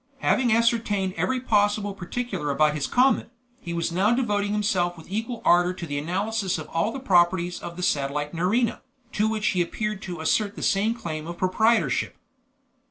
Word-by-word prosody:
Having 245 -2 +2
ascertained 220 -4 +1
every 260 +2 0
possible 205 -3 +1
particular 195 -3 -4
about 150 +1 +3
his 150 -2 -2
comet, 255 -1 +2 0.3
he 175 -8 -7
was 170 0 -1
now 190 +6 +2
devoting 205 -5 0
himself 185 -4 0
with 160 - -12
equal 225 +3 -3
ardor 175 +1 +4
to 180 - -7
the 145 -2 -3
analysis 190 +5 -1
of 155 -1 -7
all 165 +7 0
the 270 - -5
properties 175 -5 +2
of 170 0 -8
the 180 - -4
satellite 145 0 -1
Nerina, 205 +8 0 0.3
to 210 +1 +1
which 215 -1 0
he 180 - +1
appeared 210 +3 -3
to 175 -3 -6
assert 200 +6 0
the - - -6
same 210 +4 +2
claim 160 -8 -5
of 170 0 -6
proprietorship. 220 +6 +1
195 Hz, 175 wpm, -25 LUFS, 170-220 Hz, 0.3 s, ardor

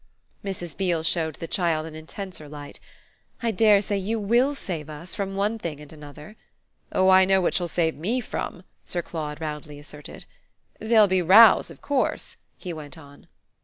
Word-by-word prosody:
Mrs. 175 -5 -5
Beale 175 -4 0
showed 160 -2 0
the - - -6
child 165 -4 0
an 160 - -9
intenser 160 0 -8
light. 145 -1 -10 0.6
"I 230 - +1
dare 210 -1 +4
say 205 0 -1
you 220 +4 -2
WILL 240 +7 +2
save 160 - -6
us 160 +3 -8
from 195 -1 -4
one 210 +3 0
thing 160 -7 -5
and 150 +1 -12
another." 150 +6 -12 0.5
"Oh 190 0 +3
I 190 0 +7
know 190 0 +3
what 180 - +1
she'll 175 - 0
save 165 -2 0
ME 215 - -2
from!" 190 -6 -5 0.2
Sir 175 -1 -3
Claude 150 -3 -5
roundly 150 -2 -6
asserted. 145 0 -11 0.5
"There'll 220 -1 +5
be 190 -2 +1
rows 195 +5 +7
of 165 - -13
course," 280 -3 -1 0.2
he 180 -3 -6
went 155 0 -9
on. 145 -2 -15
175 Hz, 175 wpm, -25 LUFS, 155-200 Hz, 0.6 s, I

